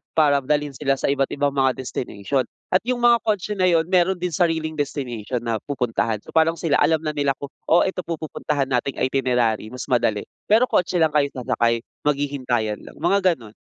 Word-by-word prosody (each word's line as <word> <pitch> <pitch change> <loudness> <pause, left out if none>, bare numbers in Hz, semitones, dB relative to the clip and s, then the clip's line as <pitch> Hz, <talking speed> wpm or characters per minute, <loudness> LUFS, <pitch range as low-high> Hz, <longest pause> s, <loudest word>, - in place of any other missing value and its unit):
para 145 -3 +4
dalhin 145 +1 -1
sila 135 0 +1
sa 140 - 0
iba't 140 -1 +1
ibang 145 0 +1
mga 135 -2 +2
destination. 125 0 -3 0.2
At 185 - +5
yung 245 -1 -1
mga 235 -1 +6
kotse 210 -1 0
na 185 -3 +2
yun, 165 -2 +4
meron 185 +1 +3
din 180 -1 -3
sariling 160 -2 0
destination 125 -4 -3
na 115 -2 -1
pupuntahan. 115 -5 -2
So, - - -13
parang 160 +1 +3
sila, 160 -3 +1
alam 155 +1 +2
na 155 - -1
nila 140 -2 0
kung, 140 0 -8 0.2
"Oh, 170 - +5
ito 190 -1 -2
po 170 -1 -3
pupuntahan 150 -3 -2
nating 125 +2 0
itinerary 125 -5 0
mas 125 +2 -7
madali." 110 -4 +2 0.2
Pero 220 +4 +5
kotse 180 0 +1
lang 160 -3 +3
kayo 145 -1 +2
sasakay. 115 -2 0 0.2
Maghihintayan 130 -7 -1
lang, - - -13
mga 200 - +2 0.2
gano'n. 115 -4 -14
140 Hz, 195 wpm, -22 LUFS, 125-165 Hz, 0.2 s, mga